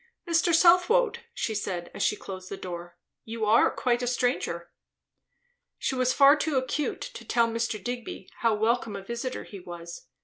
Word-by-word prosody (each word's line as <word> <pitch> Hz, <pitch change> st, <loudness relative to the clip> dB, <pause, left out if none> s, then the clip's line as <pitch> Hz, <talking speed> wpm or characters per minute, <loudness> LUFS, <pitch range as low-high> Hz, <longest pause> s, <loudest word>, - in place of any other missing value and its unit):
"Mr. 335 Hz, 0 st, +3 dB
Southwode!" 365 Hz, +9 st, +5 dB
she 235 Hz, -, -2 dB
said 180 Hz, -4 st, -4 dB
as -, -, -6 dB
she -, -, +2 dB
closed 185 Hz, -2 st, -8 dB
the 195 Hz, -, -5 dB
door. 175 Hz, -1 st, -7 dB, 0.3 s
"You 225 Hz, -1 st, -3 dB
are 220 Hz, +2 st, +5 dB
quite 245 Hz, -1 st, 0 dB
a 245 Hz, -, -1 dB
stranger." 210 Hz, -9 st, -1 dB, 1.1 s
She -, -, -1 dB
was 255 Hz, -1 st, +2 dB
far 280 Hz, +2 st, +7 dB
too 300 Hz, -2 st, -1 dB
acute 260 Hz, +3 st, -1 dB
to -, -, -7 dB
tell 235 Hz, -1 st, +2 dB
Mr. 230 Hz, 0 st, -2 dB
Digby 240 Hz, -3 st, -6 dB
how 230 Hz, -2 st, +2 dB
welcome 220 Hz, 0 st, 0 dB
a 195 Hz, -, -6 dB
visiter 235 Hz, +4 st, -4 dB
he 200 Hz, -, -10 dB
was. 175 Hz, -1 st, -9 dB
235 Hz, 170 wpm, -27 LUFS, 195-265 Hz, 1.1 s, far